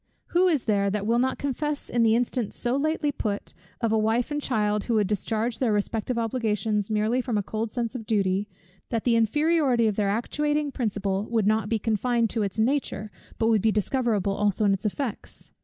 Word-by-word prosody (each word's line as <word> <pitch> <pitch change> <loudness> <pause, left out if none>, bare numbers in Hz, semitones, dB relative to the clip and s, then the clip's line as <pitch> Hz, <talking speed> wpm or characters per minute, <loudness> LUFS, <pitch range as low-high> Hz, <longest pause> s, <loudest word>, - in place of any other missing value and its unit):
Who 360 +2 +3
is 310 -8 +1
there 200 -2 +2
that 205 0 -2
will 230 +2 +2
not 260 +1 +1
confess 285 +1 -2
in 240 - 0
the 225 -1 +4
instance 240 -2 -1
so 240 +1 -1
lately 295 +1 0
put, 210 -6 -4 0.3
of 230 -2 +1
a 220 - +3
wife 225 +5 +1
and 295 0 -1
a - - -12
child 210 -4 0
who 230 -2 +1
should 205 - +2
discharge 220 +4 -1
their 250 -4 +2
respective 220 +3 -1
obligations 220 -3 -1
merely 215 +4 +1
from 240 -4 -1
a 205 - 0
cold 220 +3 -3
sense 235 -1 -2
of 225 -4 -7
duty, 200 -1 +1 0.4
that 230 -2 -1
the 240 -2 +3
inferiority 270 +1 +2
of 215 -2 0
their 205 -2 +1
actuating 295 +7 0
principle 205 -5 -1
would 225 -3 +1
not 215 0 +1
be 225 - +2
confined 230 +1 0
to 225 - -1
its 200 -1 -2
nature, 220 -3 0 0.3
but 225 - +2
would 220 -3 +3
be 220 - +3
discoverable 210 -2 0
also 210 +1 +1
in 200 - +4
its 195 +2 -1
effects? 235 +1 -5
225 Hz, 205 wpm, -26 LUFS, 210-250 Hz, 0.4 s, the